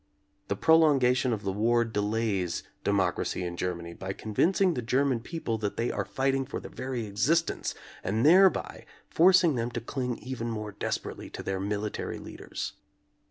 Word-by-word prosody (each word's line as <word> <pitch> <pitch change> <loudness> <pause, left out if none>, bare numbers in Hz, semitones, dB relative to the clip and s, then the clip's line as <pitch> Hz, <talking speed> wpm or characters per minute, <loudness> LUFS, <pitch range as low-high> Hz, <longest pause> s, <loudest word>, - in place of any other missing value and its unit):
The 100 - -1
prolongation 135 -4 +4
of 110 -3 -2
the 95 - -1
war 115 +4 +2
delays 105 -4 -1 0.2
de - - 0
mocracy 95 -2 0
in 85 0 -4
Germany 85 -1 -3
by 95 +2 -5
convincing 175 - +2
the 125 - -2
German 130 +2 +1
people 115 -4 -4
that 105 -1 -3
they 120 - 0
are - - -2
fighting 135 0 0
for 130 - -5
their - - -10
very 130 -3 -4
exist 135 +12 +2
ence - - -4 0.3
and 110 +6 0
thereby 185 +4 +4 0.2
forcing 180 -1 +5
them 120 -2 -1
to 120 - -4
cling 125 +1 -3
even 125 -2 -5
more 105 -2 -4
desperately - - -4
to - - -7
their 95 -1 -2
military 105 +2 -3
leaders. - - -6
115 Hz, 165 wpm, -28 LUFS, 100-135 Hz, 0.3 s, forcing